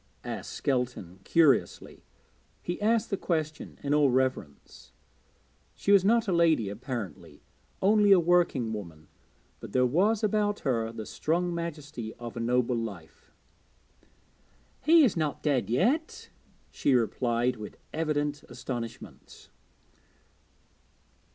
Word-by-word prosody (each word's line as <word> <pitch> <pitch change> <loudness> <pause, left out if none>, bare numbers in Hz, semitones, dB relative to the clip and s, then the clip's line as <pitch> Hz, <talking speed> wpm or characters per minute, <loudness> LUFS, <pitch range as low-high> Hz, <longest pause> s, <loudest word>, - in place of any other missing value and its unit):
asked - - -6
Skelton 125 -9 -2
curiously. 155 -7 +2 0.6
He 175 +3 -4
asked 225 +1 +1
the 195 - 0
question 155 -4 -3
in 145 0 0
all 150 -2 +4
reverence; 130 - -3 0.8
she 200 - -1
was 200 -2 +6
not 230 +3 +3
a - - +1
lady 160 - +3
apparently, 105 - -7 0.4
only 205 +1 +4
a 195 - +8
working 170 -9 +2
woman, 85 -7 -9 0.5
but - - -10
there 125 0 +3
was 200 - +2
about 210 -1 0
her 115 -5 -1
the 110 -1 -7
strong 175 +8 -1
majesty 150 -9 -6
of 120 -1 -8
a - - -4
noble 125 +1 +1
life. 100 -9 -7 1.5
'He 325 +2 +6
is 245 - +3
not 155 -3 -2
dead 140 -7 +1
yet,' 245 - 0 0.4
she 135 - +1
replied 120 +1 0
with 105 -1 -9 0.2
evident 150 -2 -1
astonishment. 120 -2 -8
140 Hz, 120 wpm, -28 LUFS, 115-175 Hz, 1.5 s, a